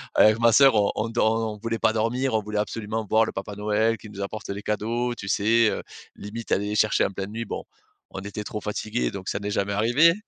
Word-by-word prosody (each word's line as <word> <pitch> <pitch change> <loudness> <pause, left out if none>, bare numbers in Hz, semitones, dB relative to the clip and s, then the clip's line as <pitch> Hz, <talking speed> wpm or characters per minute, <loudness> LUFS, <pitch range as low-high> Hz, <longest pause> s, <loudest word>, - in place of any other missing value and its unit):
Avec 110 +1 +6
ma 115 0 +5
sœur 135 -2 +7
on 100 -1 +3
on 110 - 0
dor 110 -1 +2 0.2
on - - -12
voulait 115 0 -3
pas 110 - +3
dormir, 120 +3 0
on 110 - +2
voulait 105 0 -2
absolument 110 +1 -3
voir 110 +1 +5
le - - -4
papa 100 +1 -5
Noël 105 +2 +1
qui 110 - -12
nous 100 -1 -8
apporte 110 +2 -5
les 100 +1 -4
cadeaux, 120 +3 -1
tu 100 -3 -7
sais? 115 +2 +3
Heu, - - -3 0.3
limite 110 +3 -8
aller 100 +1 0
les 105 - -2
chercher 110 0 +3
en - - -2
pleine 95 +1 -5
nuit. 115 +1 -4
Bon, - - -5 0.5
on 95 - -6
était 100 +1 -6
trop 105 - -5
fatigués, 105 - -2
donc 95 -1 -6
ça 100 - -2
n'est 100 0 -4
jamais 100 0 -1
arrivé. 120 +11 +5
110 Hz, 245 wpm, -25 LUFS, 105-115 Hz, 0.5 s, sœur